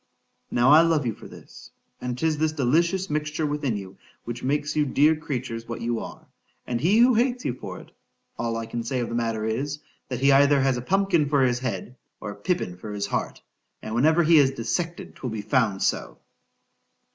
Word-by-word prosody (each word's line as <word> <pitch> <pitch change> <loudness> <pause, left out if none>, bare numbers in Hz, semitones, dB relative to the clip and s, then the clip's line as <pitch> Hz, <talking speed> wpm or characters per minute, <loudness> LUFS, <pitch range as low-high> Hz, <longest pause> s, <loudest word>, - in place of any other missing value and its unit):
Now 120 +3 +3
I 155 +2 +9
love 165 -4 +2
you 115 - -1
for - - -12
this—and 125 -1 -10
'tis 155 +2 0
this 155 0 +1
delicious 170 +7 +1
mixture 155 +1 -2
within 145 -6 -1
you 95 -1 -9 0.3
which 120 +1 -6
makes 145 +3 -1
you 150 - +3
dear 145 +3 +3
creatures 130 -7 -5
what 115 - -5
you 115 -1 -1
are—and 120 +1 -8
he 190 +8 +3
who 245 +2 +6
hates 245 +2 +1
you 125 - 0
for 130 - -8
it——all 115 -1 -8
I 115 - -4
can 120 +1 -4
say 125 +3 -2
of 120 - -3
the - - -5
matter 115 -2 -1
is—That 130 +1 -5
he 135 +1 +3
has 135 0 +7
either 140 0 +3
a 130 -2 +1
pumpkin 180 -1 +1
for 140 -2 +3
his 125 -1 +2
head—or 125 -4 -6
a - - -9
pippin 175 - -2
for 105 +4 -8
his 100 -1 -2
heart,—and 110 - -6
whenever 155 +8 +4
he 160 0 +6
is 135 -2 +5
dissected 160 +7 -4
'twill 130 - -4
be 110 -2 -5
found 110 -3 +1
so. - - -1
135 Hz, 190 wpm, -25 LUFS, 115-155 Hz, 0.3 s, I